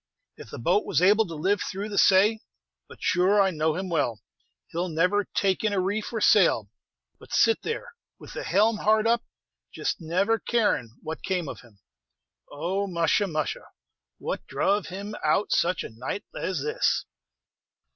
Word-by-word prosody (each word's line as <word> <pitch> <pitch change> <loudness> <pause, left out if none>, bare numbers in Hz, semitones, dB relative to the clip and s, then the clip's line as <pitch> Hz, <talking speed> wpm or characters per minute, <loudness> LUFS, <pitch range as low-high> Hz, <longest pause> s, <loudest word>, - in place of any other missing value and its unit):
"If - - -12
the - - -8
boat 180 - +2
was - - 0
able 205 +4 +4
to 165 - -7
live 195 +6 0
through 200 +3 -4
the 205 - -5
say. 205 +3 +5 0.5
But - - -13
sure 185 +3 +3
I 195 -1 +4
know 155 -1 0
him 190 +1 -3
well; 145 -10 -1 0.5
he - - -7
'll 180 +1 -1
never 180 +6 +1
take 195 0 +1
in 215 -2 +1
a 195 - +1
reef 205 +3 -2
or 225 - -2
sail, - - +4 0.5
but - - -16
sit 455 - +3
there, 450 - -5 0.2
with - - -12
the - - -5
helm 215 +2 +2
hard 215 +1 +2
up, 235 +1 +3 0.5
just - - -2
never 195 +8 +1
carin' 210 - 0
what 160 - -6
came 180 -4 -2
of - - -7
him! 105 -5 -21 0.7
Oh, 185 +7 -2
musha! 175 +3 +1
musha! 155 -4 -3 0.5
what - - -5
druv 205 -1 0
him 200 +3 -6
out 155 +7 +1
such 180 +2 +1
a - - -7
night 125 - -5
as 180 -7 -2
this!" 150 - 0
190 Hz, 175 wpm, -26 LUFS, 165-205 Hz, 0.7 s, say